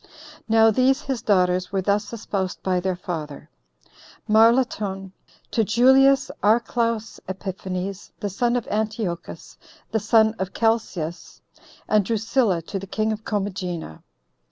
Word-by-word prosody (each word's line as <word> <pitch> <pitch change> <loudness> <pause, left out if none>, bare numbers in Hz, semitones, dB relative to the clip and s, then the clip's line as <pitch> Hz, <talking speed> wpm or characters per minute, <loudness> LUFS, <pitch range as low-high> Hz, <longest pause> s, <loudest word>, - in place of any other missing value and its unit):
Now 225 0 +5
these 265 +6 +2
his 265 -4 -3
daughters 185 -2 +1
were 195 -1 -1
thus 205 +2 0
espoused 195 -5 -4
by 185 -1 +1
their 185 0 -1
father; 160 -5 -6 0.8
Marlatone 215 -4 +2 0.4
to 225 - +2
Julius 265 +5 +4
Archelaus 230 +1 +1
Epiphanes, 190 0 -5
the 205 - -3
son 240 +5 0
of 245 - -2
Antiochus, 210 -5 -4 0.3
the 220 - +1
son 220 +1 +4
of 190 0 -4
Chelcias; 205 -8 -2 0.4
and 215 -1 +3
Drusilla 220 -4 0
to 195 +4 -5
the 195 - -9
king 215 +3 -1
of 215 0 -5
Commagena. 185 - -4
210 Hz, 125 wpm, -23 LUFS, 185-225 Hz, 0.8 s, Now